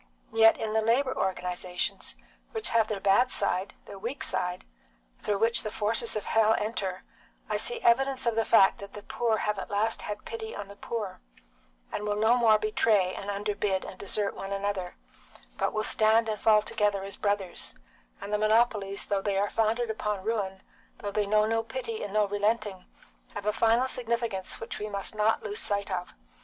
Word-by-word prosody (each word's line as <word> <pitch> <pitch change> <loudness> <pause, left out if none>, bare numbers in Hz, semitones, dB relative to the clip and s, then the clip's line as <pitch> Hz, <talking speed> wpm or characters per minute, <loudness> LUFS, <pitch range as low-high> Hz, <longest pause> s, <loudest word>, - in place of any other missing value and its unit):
Yet 225 0 +6
in 215 -1 -3
the 220 - +3
labour 255 +4 +2
organisations, 180 -1 -2 0.4
which 445 -2 0
have 225 -1 +3
their 215 -2 -3
bad 200 +6 +4
side, 190 +2 0
their 200 - -10
weak 235 +7 -4
side, 180 0 -2 0.5
through 205 - -1
which 230 +2 +3
the 215 - -4
forces 225 +2 +1
of 210 - -3
hell 220 0 +3
enter, 195 -4 -3 0.4
I - - 0
see 480 -1 0
evidence 265 +2 +3
of 235 - +2
the 225 0 +1
fact 195 -4 +5
that 200 0 -9
the 205 - -9
poor 230 -2 0
have 210 -1 -1
at - - -6
last 215 +2 0
had 210 0 -6
pity 225 -1 -6
on 205 -1 -7
the 200 - -10
poor, 210 -3 -5 0.7
and 210 - -3
will 210 0 -1
no 220 +3 +4
more 225 -3 +5
betray 210 -3 +2
and 200 - -6
underbid 200 -1 -1
and 185 - -9
desert 200 0 0
one 195 0 -6
another, 195 -2 -2 0.6
but - - +1
will 215 - -1
stand 220 +1 +4
and 215 -1 -3
fall 215 -1 +5
together 205 -2 0
as 195 0 -6
brothers; 200 -3 -2 0.4
and 200 +1 -6
the 210 - +2
monopolies, 215 -2 +2
though 200 -1 0
they 195 -1 -1
are 200 +1 0
founded 225 +1 +1
upon 210 -3 -3
ruin, 195 -3 -2 0.3
though 205 - -5
they 205 0 0
know 215 +1 +4
no 225 +1 +1
pity 230 -1 -5
and 205 - -5
no 210 0 +3
relenting, 205 -1 -1 0.5
have 205 -1 -5
a 210 - +1
final 230 +3 +3
significance 235 -6 -2
which 225 - -6
we 210 - -4
must 200 0 -3
not 215 +1 +1
lose 210 -1 -2
sight 200 -1 0
of. 180 -1 -4
210 Hz, 190 wpm, -28 LUFS, 200-225 Hz, 0.7 s, Yet